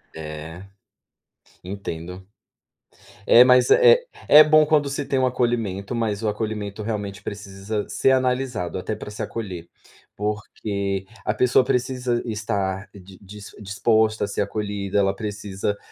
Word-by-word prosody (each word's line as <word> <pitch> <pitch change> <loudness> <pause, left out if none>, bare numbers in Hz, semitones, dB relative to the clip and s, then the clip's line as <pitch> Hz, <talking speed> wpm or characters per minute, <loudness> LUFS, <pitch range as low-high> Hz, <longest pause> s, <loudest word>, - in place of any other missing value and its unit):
É. 80 +2 -8 1.0
entendo. 90 -1 -7 1.0
É, 120 - +9
mas, 125 0 +5
eh 485 0 +6 0.2
é 150 +1 +9
bom 155 0 +5
quando 150 -2 +2
se 140 0 -3
tem 135 - 0
um 130 - +3
acolhimento, 115 -5 -1
mas 115 -3 -2
o - - 0
acolhimento 105 -1 -4
realmente 105 -2 -4
precisa 100 +1 -5
ser 135 - +2
analisado, 125 -8 0
até 110 +4 -4
para 105 - -9
se 105 - -7
acolher, 95 -7 -5 0.5
porque 100 -2 -3 0.2
a 105 - 0
pessoa 125 +2 +4
precisa 125 -1 -1
estar 100 -4 -3
di 95 -1 -14
dis 100 0 -11
disposta 110 +2 +1
a - - 0
ser 100 - -2
acolhida, 100 -1 -3
ela 95 0 +1
precisa 105 -1 -4
105 Hz, 135 wpm, -23 LUFS, 100-120 Hz, 1.0 s, É